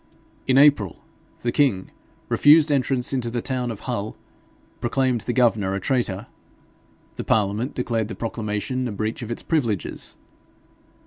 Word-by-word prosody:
In 130 0 +4
April, 140 - +5 0.4
the 120 - 0
king, 115 -10 +1 0.4
refused 150 +1 +6
entrance 135 -2 +1
into 125 -3 -1
the 120 +1 -2
town 125 0 -2
of 110 -3 -6
Hull, 110 -4 -4 0.6
proclaimed 125 -1 0
the 120 - -2
governor 110 -6 +2
a - - -1
traitor. 105 -2 -1 0.9
The - - -3
parliament 110 +5 0
declared 115 -4 -1
the 110 - -6
proclamation 115 +3 -3
a - - -4
breach 110 +3 -3
of 115 - -6
its 120 - -4
privileges. 115 - -1
120 Hz, 140 wpm, -23 LUFS, 105-130 Hz, 0.9 s, refused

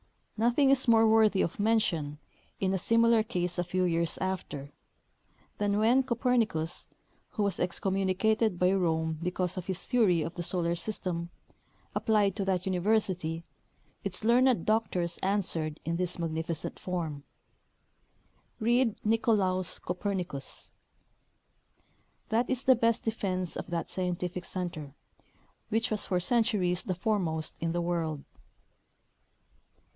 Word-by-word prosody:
Nothing 240 +5 +3
is 270 -1 +2
more 225 -1 +6
worthy 220 -3 +4
of 170 - -4
mention, 190 -9 +1 0.4
in 190 -1 +1
a 190 - 0
similar 230 +3 +4
case 180 -5 -2
a - - +2
few 185 +1 -1
years 170 -2 0
after, 180 -7 -4 0.9
than 205 0 +1
when 230 +5 +4
Copernicus, 235 -10 0 0.4
who 210 - 0
was 200 -3 -1
excommunicated 195 +3 +1
by 180 +1 +3
Rome 160 -4 0
because 180 +1 -2
of 180 - -5
his 190 -2 -3
theory 200 -10 +3
of 165 - -5
the 175 - -5
solar 170 -1 0
system, 175 -2 -3 0.6
applied 210 -4 +2
to 200 - -2
that 185 -2 0
university, 185 -4 0 0.6
its 195 0 -1
learned 240 -3 +4
doctors 185 -6 0
answered 170 -6 -1
in 170 0 -1
this 180 0 -1
magnificent 160 -1 -3
form: 160 -6 -4 0.7
" - - -40
Read 235 0 +2
Nicolaus 205 -5 +1
Copernicus.^^ 180 -6 -4 1.6
That 230 +3 +1
is 260 0 -1
the 260 - +6
best 230 -1 +1
defense 185 -5 -2
of - - -5
that 170 -1 -3
scientific 180 -1 -3
center, 170 -6 -4 0.8
which 225 +2 +1
was 215 - 0
for 180 - +1
centuries 205 -4 +1
the 185 - -2
foremost 175 -5 -1
in 165 0 0
the 175 +1 -1
world. 165 -4 -2
185 Hz, 130 wpm, -29 LUFS, 170-220 Hz, 1.6 s, more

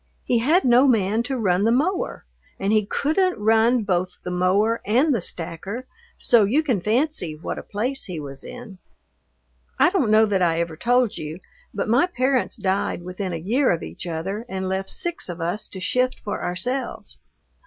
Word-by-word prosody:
He 240 - +1
had 315 +11 +3
no 250 +2 +6
man 220 -2 +2
to 265 +2 -2
run 190 -4 +1
the 225 - +3
mower 340 +10 0 0.3
and 195 +2 +1
he 215 -2 +2
couldn't 340 - +1
run 225 +3 +3
both 180 -2 -1
the 180 - -4
mower 195 +6 +2
and 260 +8 +3
the 230 - 0
stacker, 180 +9 -3 0.3
so 235 -3 +4
you 260 +11 +2
can 250 - 0
fancy 220 - 0
what 155 - -5
a - - -6
place 245 +7 -3
he 175 -4 -5
was 140 -2 -9
in. 230 -7 -10 1.0
I 355 - +4
don't 345 - +1
know 215 +1 +6
that 200 -3 0
I 165 -2 +2
ever 170 -1 -2
told 240 +5 +1
you, 155 +3 -6 0.3
but - - -3
my 245 +10 +3
parents 260 -6 0
died 195 -4 -1
within 185 +1 -4
a - - -3
year 235 - +1
of 170 - -1
each 180 - -7
other 185 +6 -3
and 190 0 -3
left 190 +1 -2
six 345 - -2
of 175 0 -6
us 175 +5 -3
to 190 - -8
shift 250 +7 0
for 205 - -4
ourselves. 245 +10 -3
215 Hz, 185 wpm, -23 LUFS, 180-250 Hz, 1.0 s, no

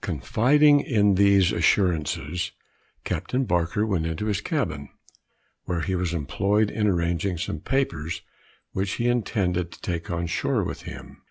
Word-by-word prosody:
Confiding 145 +5 +4
in 105 -7 +2
these 100 -1 +4
assurances, 85 -3 0 0.5
Captain 130 +1 -1
Barker 90 +2 0
went 90 -7 0
into 80 +6 -3
his 105 -2 -1
cabin, 80 - -2 0.8
where 90 -2 -2
he 85 +5 -2
was 90 -2 -1
employed 100 +7 0
in 105 -1 0
arranging 85 0 0
some 80 -1 -3
papers 85 - -2 0.5
which 95 +1 -2
he 120 - -1
intended 95 -7 0
to - - -13
take 85 -2 -4
on 85 0 -2
shore 80 - 0
with - - -5
him. - - -11
95 Hz, 145 wpm, -25 LUFS, 85-105 Hz, 0.8 s, Confiding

